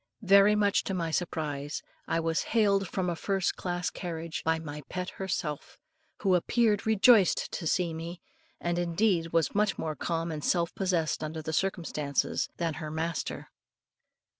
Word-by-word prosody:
Very 200 +1 +6
much 205 -1 +2
to 195 - -2
my 165 -2 -1
surprise, 150 -4 -2 0.2
I 165 - +1
was 165 +1 0 0.2
hailed 200 -3 +3
from 185 +1 -2
a 175 - 0
first 195 +1 0
class 175 -1 -2
carriage 165 -2 -5
by 160 0 +2
my 150 -2 -7
pet 180 0 -4
herself, 155 -6 -3 0.5
who 195 -2 +4
appeared 215 +4 +2
rejoiced 220 -2 +5
to 165 - -3
see 175 0 +1
me, 165 +2 -6 0.4
and 175 0 -1
indeed 170 -1 +1
was 165 -4 +2
much 210 0 +1
more 155 -1 -3
calm 165 +1 -2
and 150 -2 -5
self 170 -1 +1
possessed, 175 -5 0
under 155 +1 -4
the 160 - -4
circumstances, 155 -6 -1
than 165 -2 -1
her 155 - -4
master. 160 +1 -3
170 Hz, 160 wpm, -29 LUFS, 160-195 Hz, 0.5 s, Very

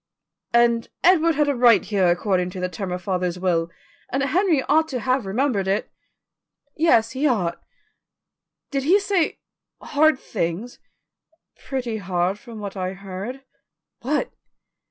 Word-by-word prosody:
"And 235 -1 +3
Edward 335 -2 +4
had 295 0 +2
a 285 - +2
right 240 -6 +5
here 195 -4 +1
according 180 +1 +1
to 185 - -7
the 180 0 -2
terms 180 +1 -5
of 180 0 -5
father's 180 -2 -1
will, 170 -2 0 0.4
and 270 +2 0
Henry 320 0 +2
ought 315 +2 +3
to 260 -5 -3
have 255 -2 0
remembered 210 -2 0
it." 195 +2 -1 0.8
"Yes, 230 -9 +3
he 270 +5 0
ought." 200 -10 0 1.1
"Did 275 -1 0
he 350 +9 +4
say 395 -5 0 0.4
hard 310 0 +3
things?" 205 0 -4 0.9
"Pretty 245 -5 -2
hard 185 0 -1
from 235 -3 -11
what 200 -1 -6
I 185 -1 -3
heard." 195 +7 -7 0.6
"What?" 290 +5 -1
230 Hz, 140 wpm, -23 LUFS, 185-275 Hz, 1.1 s, right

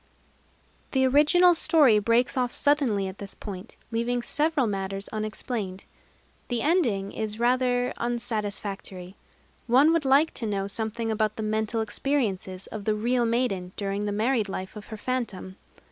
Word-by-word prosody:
[Decoration] - - -35
The 265 -1 +3
original 305 +7 +5
story 295 -9 +5
breaks 230 +5 +2
off 250 -2 0
suddenly 275 -9 +1
at 190 +1 -8
this 200 -1 -8
point, 200 0 -9
leaving 235 +1 -1
several 300 -1 +1
matters 195 -1 -3
unexplained. 215 -2 -4 0.6
The 240 -2 -1
ending 235 - +1
is 215 0 -4
rather 245 0 +2
unsatisfactory. 205 -5 -3 0.5
One 270 +7 +5
would 330 -2 +1
like 280 +4 +4
to 225 - -2
know 200 -2 -1
something 220 +2 -2
about 215 -1 0
the 220 - -4
mental 220 +1 0
experiences 205 -6 -2
of 210 -2 -7
the 215 - +1
real 240 +3 +1
maiden 225 -6 -1
during 200 +1 -2
the - - -1
married 220 0 +1
life 190 +1 -5
of 210 - -9
her 220 - -7
phantom. 210 -6 -3
225 Hz, 150 wpm, -26 LUFS, 200-255 Hz, 0.6 s, original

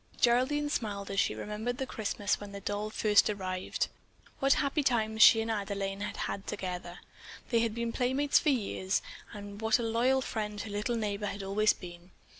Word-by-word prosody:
Geraldine 260 +5 +3
smiled 200 -6 -3
as 195 - 0
she 105 - +2
remembered 215 - -3
the 265 - -2
Christmas 210 -3 -1
when 205 -1 -8
that 200 - -8
doll 205 +1 -2
had - - -14
first 210 -1 +4
arrived. 185 -3 -2 0.5
What 275 +1 +5
happy 285 +1 +1
times 220 -5 +1
she 225 +1 +9
and 225 0 -2
Adelaine 200 -2 -3
had 210 - -4
had 195 - -5
together. 180 -2 -5 0.5
They 230 - +4
had 225 -1 0
been 235 0 -2
playmates 265 +4 +2
for 310 - +1
years, 200 -6 0 0.3
and 205 0 -8
what 220 0 +3
a 240 - -3
loyal 240 +4 +2
friend 210 -4 -3
her 215 - -7
little 210 +4 -1
neighbor 210 -2 -2
had 200 0 -5
always 210 +2 +3
been. 175 -1 -11
215 Hz, 190 wpm, -31 LUFS, 200-235 Hz, 0.5 s, she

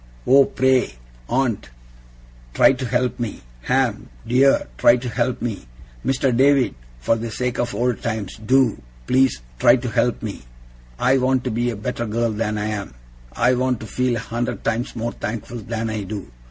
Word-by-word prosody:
'Oh, 135 +1 +6
pray, 130 - +1 0.3
aunt, 125 - 0 0.9
try - - +6
to 130 -1 -4
help 125 +1 0
me! 115 -4 -4 0.2
Ham, 125 -5 0 0.2
dear, 130 +3 +4
try 120 - +6
to 125 +1 -6
help 120 +1 -1
me! 100 - -4 0.4
Mr. 130 -1 +1
David, 135 +1 +4 0.3
for - - +2
the 115 +1 -4
sake 125 +2 -3
of 120 -4 -1
old 120 +1 0
times, 110 -4 -3
do, 130 0 +3 0.2
please, 130 - +2 0.2
try 120 - +6
to 125 -1 -3
help 120 +1 0
me! 105 -3 -5 0.6
I 130 - +3
want 130 0 +1
to 125 - -2
be 120 +2 0
a 120 - -3
better 120 +2 -3
girl 115 +2 0
than 105 0 -2
I 105 - -2
am. 100 - -5 0.4
I 125 - +3
want 125 -1 0
to - - -6
feel 125 +3 0
a - - -2
hundred 120 +2 -4
times 115 +2 -2
more 115 0 -2
thankful 115 +2 -5
than 110 +1 -3
I 110 -1 -3
do. 100 - -6
120 Hz, 180 wpm, -21 LUFS, 110-130 Hz, 0.9 s, Oh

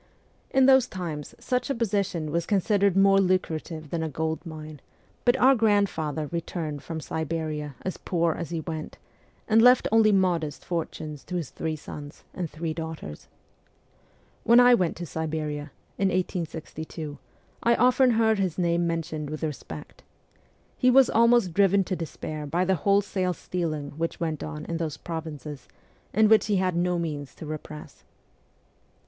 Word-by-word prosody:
In 265 0 +4
those 265 -2 +6
times 165 -6 -6
such 250 +1 -1
a 275 - 0
position 200 -8 -1
was 170 +1 -1
con 205 -2 +3
sidered 200 -1 +2
more 195 0 +5
lucrative 165 -4 -1
than 170 - -1
a 160 - -2
gold 160 +2 -2
mine, 155 -3 -9 0.4
but 245 +1 +4
our 265 +1 +6
grand 205 -4 +3
father 155 -1 -3
returned 165 -3 -4
from 165 -1 -5
Siberia 155 -2 -3
as 185 - -3
poor 170 -2 0
as 170 -1 -5
he 165 -1 -3
went, 155 -1 -6 0.5
and 225 0 +5
left 250 +1 +6
only 220 -1 +5
modest 175 -6 +1
fortunes 155 -3 -4
to 180 - -5
his 165 -6 -3
three 160 -1 -3
sons 150 -1 -10
and 175 -3 -4
three 160 +1 -4
daugh 160 0 -5
ters. 75 - -10 1.2
When 235 +2 +6
I 245 0 +7
went 180 -8 +1
to 175 - -5
Siberia, 155 -2 -3 0.3
in 195 - +3
1862, 160 -4 -4 0.4
I 235 0 +4
often 255 +2 +4
heard 220 -2 +3
his 185 -4 -1
name 170 -1 +1
mentioned 160 -3 -3
with 155 +1 -5
respect. 135 - -6 0.8
He 255 - +4
was 260 0 +6
almost 235 -5 +4
driven 200 +1 +4
to 185 - -2
despair 155 -2 -5
by 175 +5 +1
the 190 - +2
wholesale 190 +1 +1
stealing 155 -5 -3
which 165 +1 -2
went 160 -3 -2
on 155 -1 -6
in 170 - -3
those 160 -3 -3
provinces, 155 -4 -7 0.4
and 215 +2 +4
which 220 0 +5
he 210 - +2
had 185 -2 +1
no 175 +1 +1
means 150 -5 -4
to - - -9
repress. 155 0 -8
170 Hz, 165 wpm, -26 LUFS, 155-200 Hz, 1.2 s, I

